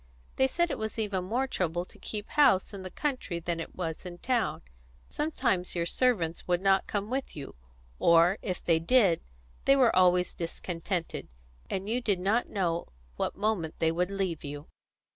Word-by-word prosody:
They 265 - +4
said 345 +5 0
it - - -3
was 220 0 -4
even 200 -4 -1
more 240 +7 0
trouble 175 -8 -1
to - - -18
keep 210 -1 -5
house 275 -11 +4
in 195 - -6
the 185 - -6
country 250 - -2
than 170 0 -3
it 165 - -7
was 165 -3 -4
in 180 -1 -8
town; 240 +4 0 0.4
sometimes 255 - 0
your 170 -1 0
servants 175 -6 +1
would 175 -1 +2
not 195 0 +3
come 205 +2 -3
with 265 +1 -3
you; 145 -3 -7 0.5
or, 170 +3 +5
if 185 -3 -4
they 165 -2 +4
did, 185 -1 +4 0.4
they 275 - +6
were 255 -4 +4
always 180 -1 +4
discontented, 170 +1 -3 0.4
and 195 +1 -3
you 240 +3 0
did 205 -6 +1
not 205 +6 +1
know 170 -4 -1 0.3
what - - -1
moment 200 -7 -1
they 160 0 +2
would 180 +2 0
leave 190 -5 -2
you. 145 +1 -6
185 Hz, 180 wpm, -29 LUFS, 170-225 Hz, 0.5 s, they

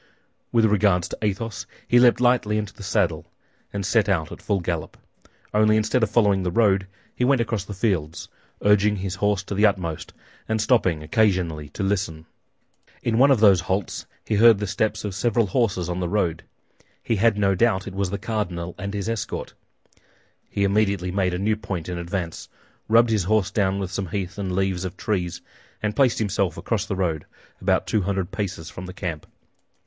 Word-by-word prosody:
With 115 -2 +4
regard 100 -4 +3
to - - -5
Athos, 105 +1 -3 0.2
he 120 - +5
leaped 120 -1 +5
lightly 120 -4 +2
into 105 -2 -3
the - - -14
saddle 95 -6 0 0.4
and 100 -1 -3
set 105 +1 +2
out 85 -5 0
at - - -9
full 100 - 0
gallop; 85 -2 -4 0.6
only 110 0 +4
instead 110 +3 +1
of 115 - +2
following 100 -3 +3
the 90 - -1
road, 95 -1 +2 0.3
he - - -2
went 135 +1 +3
across 115 -4 -1
the 105 - -7
fields, 85 -6 -1 0.4
urging 105 0 +4
his 95 -2 -4
horse 105 -1 +1
to 100 - -6
the 105 +2 +5
utmost 90 -6 -3 0.4
and 110 0 +1
stopping 105 -9 +2
occasionally 85 -5 +1
to 100 - -5
listen. 95 -5 -2 0.8
In 115 0 +1
one 135 +2 +6
of 130 -6 +4
those 100 -5 +6
halts 95 +1 -3 0.2
he - - -2
heard 115 0 +7
the 105 - -3
steps 110 +2 -1
of 100 - -3
several 115 +3 +1
horses 95 -4 0
on 90 0 -3
the 90 -2 -2
road. 90 -6 0 0.6
He 115 - 0
had 110 +1 +3
no 100 -1 +3
doubt 100 -1 +2
it 100 - -7
was 100 -1 -1
the 100 - -3
cardinal 95 -6 -3
and 100 +2 -4
his 100 +1 -3
escort. 115 -1 -4 1.0
He 100 - -1
immediately 100 -2 +1
made 90 -1 0
a - - -2
new 105 +4 +1
point 95 -6 -5
in 90 -1 -4
advance, 85 -1 -4 0.4
rubbed 115 +1 +5
his 105 -5 +1
horse 105 -1 +1
down 100 -2 +1
with 95 -2 -3
some 95 -1 -3
heath 95 +2 -4
and 95 -2 -2
leaves 95 -2 0
of 90 -2 -5
trees, 90 -5 -2 0.4
and 105 0 -1
placed 130 -2 +3
himself 100 -5 0
across 110 -2 -2
the 100 - -2
road, 85 -5 -2 0.3
about - - +1
two 110 - +1
hundred 95 -1 -2
paces 95 -6 -4
from 90 +2 -8
the 90 - -8
camp. 85 -6 -5
100 Hz, 195 wpm, -23 LUFS, 90-110 Hz, 1.0 s, heard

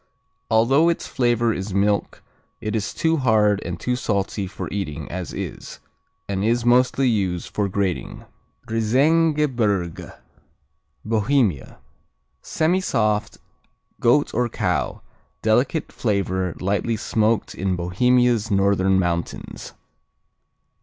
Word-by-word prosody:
Although 130 +9 +4
its 170 - -1
flavor 120 -2 +1
is 95 0 -5
milk 100 +1 0 0.4
it 110 -1 -3
is 105 -2 -2
too 165 0 +1
hard 105 -6 +3
and - - -5
too 125 - -1
salty 100 -4 -2
for 90 - -6
eating 80 -6 -4
as 90 0 -5
is, - - -7 0.5
and 100 -1 -2
is 115 +2 +1
mostly 125 +2 +3
used 95 -7 -1
for 100 -2 0
grating. 95 -2 -3 0.4
Riesengebirge 120 - +1 0.9
Bohemia 110 - 0 0.6
Semisoft; 155 - 0 0.6
goat 135 +5 +3
or 120 -1 0
cow; - - -2 0.4
delicate 125 +8 +1
flavor, 95 -5 -1
lightly 100 +4 -1
smoked 110 +1 0
in 95 0 -1
Bohemia's 115 +5 +2
northern 95 -1 +2
mountains. 85 -2 -3
110 Hz, 105 wpm, -22 LUFS, 95-125 Hz, 0.9 s, Although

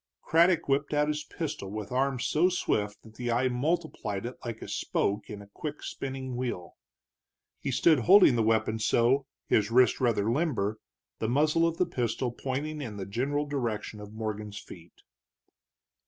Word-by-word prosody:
Craddock 170 +1 +3
whipped 140 +2 +1
out 150 0 +2
his 150 0 -2
pistol 150 - -5
with 105 +2 -6
arm 130 0 +1
so 165 +8 +2
swift 105 - -1
that 110 - -15
the 120 -1 -3
eye 125 +3 +2
multiplied 125 - -2
it 125 - -5
like 115 -2 -5
a - - -7
spoke 100 +1 -1
in 105 -1 -7
a - - -16
quick 150 -1 -6
spinning 130 -1 -5
wheel. 120 -9 -4 0.8
He - - -3
stood 150 +3 +4
holding 185 - +7
the 115 - +2
weapon 110 0 +1
so, 120 +5 +2 0.2
his 105 -1 +2
wrist 125 +2 +4
rather 115 -3 +2
limber, 115 -8 0 0.4
the 110 - -1
muzzle 155 +5 +3
of 165 0 -2
the 180 - +3
pistol 125 -5 -2
pointing 140 +5 -4
in 110 -7 -6
the 95 - -4
general 135 +9 -1
direction 120 -7 -3
of 105 0 -9
Morgan's 105 -1 -5
feet. 85 -4 -13
125 Hz, 170 wpm, -29 LUFS, 110-145 Hz, 0.8 s, holding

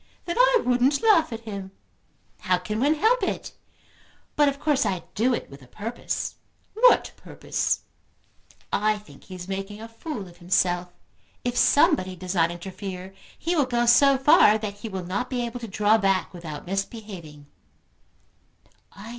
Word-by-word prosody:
"Then 345 - -3
I - - +4
wouldn't 250 - +2
laugh 410 - +4
at 225 -1 -5
him." 200 -4 -7 0.7
"How 185 -1 +1
can 210 +4 -4
one 290 +5 +3
help 450 +10 +2
it? - - -3 0.8
But 295 -1 +4
of 280 0 -6
course 290 -2 +2
I 185 -2 -2
do 240 +5 +2
it - - -6
with 140 0 -13
a 130 - -16
purpose." 220 - -4 0.4
"What 485 +3 +4
purpose?" - - -2 0.9
"I 215 +1 +2
think 210 0 -16
he 185 - -9
is 180 0 -8
making 195 +2 -5
a 225 - -8
fool 230 - -7
of 175 -1 -16
himself. 180 0 0 0.5
If 245 0 -2
somebody 285 - +3
does 180 +1 -5
not 165 -3 +3
interfere 185 +1 -7 0.2
he 345 +2 -1
will 290 -5 +2
go 240 -1 +1
so 270 +3 +6
far 260 -6 +6
that 210 -2 -5
he 225 - -6
will 190 -3 -5
not 200 +8 -3
be 245 -2 -1
able 235 +1 -6
to 230 - -7
draw 210 +2 +3
back 195 -2 +1
without 160 -4 -8
misbehaving." 190 -6 -6
215 Hz, 165 wpm, -25 LUFS, 185-260 Hz, 0.9 s, so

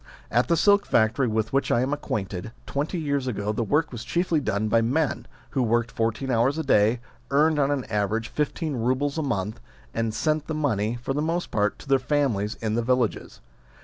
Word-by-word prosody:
At 120 +3 +2
the 170 - +2
silk 205 +3 +4
factory 115 +4 +2
with 110 +1 -1
which 135 - +1
I 120 - +3
am 130 +3 0
acquainted, 100 -7 -4
twenty 145 +6 -2
years 140 -4 -1
ago 105 -3 -1
the 115 - -1
work 150 +7 +1
was 120 -3 -6
chiefly 170 +6 +1
done 110 -6 -1
by 115 +1 +3
men, 140 +7 0 0.2
who 135 - 0
worked 115 0 +1
fourteen 115 +4 -1
hours 125 +5 +2
a 160 - -1
day, 110 +1 +3 0.3
earned 150 +2 +3
on 140 -1 +3
an 145 -3 0
average 105 +2 -1
fifteen 150 0 -2
roubles 130 +6 0
a - - +1
month, 105 -7 -2 0.3
and 115 -1 -1
sent 155 +6 0
the 160 - -2
money, 120 -7 0
for 135 - -1
the 145 - -1
most 165 +3 -1
part, 105 -1 +1
to - - -14
their 135 -1 +4
families 125 -6 0
in 110 -1 0
the 120 - +1
villages. 125 -1 -1
125 Hz, 205 wpm, -25 LUFS, 110-145 Hz, 0.3 s, silk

